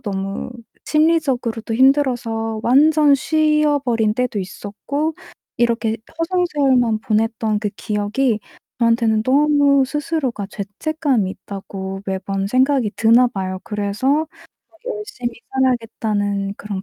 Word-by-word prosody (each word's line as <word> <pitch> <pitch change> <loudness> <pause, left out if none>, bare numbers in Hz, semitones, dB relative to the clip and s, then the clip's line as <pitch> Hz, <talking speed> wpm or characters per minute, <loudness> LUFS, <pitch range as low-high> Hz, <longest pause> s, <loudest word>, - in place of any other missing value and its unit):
너무 195 +1 -4 0.3
심리적으로도 270 -8 +1
힘들어서 240 -4 +1
완전 295 +3 +5
쉬어버린 290 -7 +2
때도 250 -2 -1
있었고 265 +11 -4 0.4
이렇게 230 -1 +1 0.2
허송세월만 290 -10 +1
보냈던 220 -1 0
그 210 -1 -2
기억이 210 +4 -1 0.4
저한테는 230 -2 +2
너무 285 +1 +4
스스로가 295 -7 -2
죄책감이 230 +2 -1
있다고 195 0 -7
매번 195 0 -2
생각이 255 0 +2
드나 235 +3 +5
봐요. 185 -5 -4
그래서 220 +9 0 0.4
'막 330 - -26 0.2
열심히 415 - -5 0.2
살아야겠다.'는 215 -6 0
그런 200 -2 -5
235 Hz, 280 characters per minute, -20 LUFS, 210-285 Hz, 0.4 s, 완전